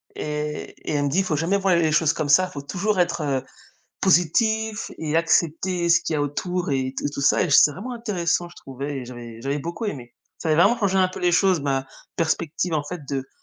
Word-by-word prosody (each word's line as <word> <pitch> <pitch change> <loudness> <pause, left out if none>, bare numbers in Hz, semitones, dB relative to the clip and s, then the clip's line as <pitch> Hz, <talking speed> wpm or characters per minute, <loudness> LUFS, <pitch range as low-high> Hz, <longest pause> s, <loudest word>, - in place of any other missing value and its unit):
Et 150 0 -4
et - - -1
elle 145 -1 +1
me - - +1
dit: 185 +7 +2
«Faut 160 - -1
jamais 165 +6 +1
voir 195 -2 +2
les 165 -2 +2
choses 155 +1 +3
comme 150 - -3
ça, 185 +6 +5
il - - -16
faut 140 - -5
toujours 190 +7 -1
être, 175 -1 +1
heu, 140 -3 -1 0.6
positif 220 +5 +2
et 155 -1 -2
accepter 170 +2 +1
ce 170 - +6
qu'il - - -3
y - - +1
a - - +1
autour», 175 +5 -2
et 130 -1 -1
tout - - -3
et - - +1
tout 140 - -5
ça 140 - +4
et 180 - -2
c'est 145 +1 +6
vraiment 210 - -6
intéressant, 180 -7 -1
je - - -17
trouvais 140 +2 -6
et 125 - -7
j'avais 120 -2 -9
j'avais 140 +3 -1
beaucoup 170 +9 -5
aimé. 125 - -6 0.2
Ça 165 - -3
avait 155 - +3
vraiment 225 +6 +4
changé 195 -4 +1
un 185 -1 +4
peu 185 - -8
les 175 -1 +2
choses, 180 -2 +3
ma 135 -1 -1 0.3
perspective, 165 +1 -1
en 150 -2 0
fait, 175 +4 -6
de 135 -1 -3
165 Hz, 240 wpm, -23 LUFS, 145-185 Hz, 0.6 s, ce